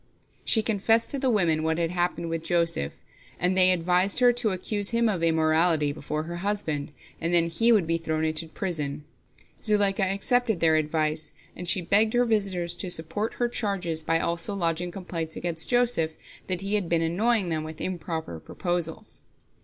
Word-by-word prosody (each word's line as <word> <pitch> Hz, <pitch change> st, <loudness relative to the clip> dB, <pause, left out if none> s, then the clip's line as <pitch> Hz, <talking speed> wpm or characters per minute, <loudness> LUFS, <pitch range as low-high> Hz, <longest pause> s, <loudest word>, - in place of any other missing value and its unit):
She 220 Hz, -, +5 dB
confessed 225 Hz, +2 st, +2 dB
to 280 Hz, -, -2 dB
the 265 Hz, -1 st, +1 dB
women 175 Hz, -9 st, +2 dB
what 160 Hz, 0 st, 0 dB
had 170 Hz, -1 st, -1 dB
happened 175 Hz, -1 st, -2 dB
with 165 Hz, -1 st, -3 dB
Joseph, 165 Hz, -, 0 dB, 0.5 s
and 180 Hz, +2 st, +1 dB
they 185 Hz, -1 st, +6 dB
advised 180 Hz, +2 st, +2 dB
her 245 Hz, -1 st, +5 dB
to 240 Hz, -2 st, +1 dB
accuse 200 Hz, +2 st, 0 dB
him 235 Hz, 0 st, +2 dB
of 195 Hz, -6 st, -1 dB
immorality 160 Hz, -1 st, +2 dB
before 155 Hz, +1 st, -4 dB
her 170 Hz, +2 st, -6 dB
husband, 175 Hz, -7 st, -3 dB, 0.3 s
and 170 Hz, +1 st, +1 dB
then 170 Hz, -1 st, +3 dB
he 230 Hz, +8 st, +3 dB
would 210 Hz, -7 st, +4 dB
be 165 Hz, +1 st, 0 dB
thrown 160 Hz, -1 st, -2 dB
into 160 Hz, +1 st, 0 dB
prison. 155 Hz, -5 st, -4 dB, 0.6 s
Zuleika 205 Hz, -2 st, +2 dB
accepted 200 Hz, +3 st, +1 dB
their 160 Hz, -1 st, +4 dB
advice, 155 Hz, 0 st, -1 dB, 0.2 s
and 180 Hz, -, -7 dB
she 185 Hz, -, +4 dB
begged 210 Hz, +5 st, +3 dB
her 245 Hz, 0 st, +3 dB
visitors 195 Hz, -6 st, 0 dB
to 185 Hz, -, -2 dB
support 170 Hz, +6 st, -1 dB
her 240 Hz, -, 0 dB
charges 195 Hz, -8 st, -1 dB
by 165 Hz, +1 st, +1 dB
also 170 Hz, +5 st, -2 dB
lodging 170 Hz, -1 st, -1 dB
complaints 170 Hz, -3 st, -5 dB
against 165 Hz, -2 st, -4 dB
Joseph, 240 Hz, -11 st, +2 dB, 0.3 s
that 185 Hz, -2 st, -2 dB
he 195 Hz, +1 st, -3 dB
had 200 Hz, -5 st, +1 dB
been 165 Hz, -1 st, +2 dB
annoying 200 Hz, +4 st, +1 dB
them 160 Hz, -1 st, -2 dB
with 155 Hz, 0 st, -8 dB
improper 165 Hz, -, -4 dB
proposals. 175 Hz, -, -4 dB
175 Hz, 175 wpm, -26 LUFS, 160-205 Hz, 0.6 s, they